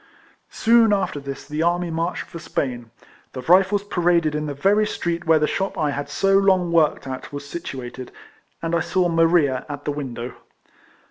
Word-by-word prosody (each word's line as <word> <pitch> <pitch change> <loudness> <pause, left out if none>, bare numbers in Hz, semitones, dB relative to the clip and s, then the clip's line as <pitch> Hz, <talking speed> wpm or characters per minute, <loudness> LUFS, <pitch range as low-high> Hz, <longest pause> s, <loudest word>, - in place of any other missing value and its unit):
Soon 230 -1 +4
after 195 -7 -1
this 140 -1 -8
the 150 +1 -3
army 175 +1 +1
marched 165 +2 -2
for 170 - -10
Spain; 125 -7 -3 0.4
the 130 - -5
Rifles 190 +6 +4
paraded 175 -5 +1
in 150 0 -2
the 145 - -4
very 205 +8 +2
street 170 -3 -3
where 160 -1 +6
the 150 - +2
shop 195 +5 -2
I 150 -2 0
had 145 0 -4
so 195 0 +2
long 185 -3 +2
worked 160 -4 +2
at 130 -1 -6
was 145 0 -7
situated, 130 -6 -7 0.5
and 165 0 -2
I 170 - +3
saw 175 +1 +1
Maria 165 -5 +3
at 145 0 -7
the 145 - 0
win 140 -4 -5
dow. 120 +2 -6
165 Hz, 185 wpm, -22 LUFS, 145-180 Hz, 0.5 s, where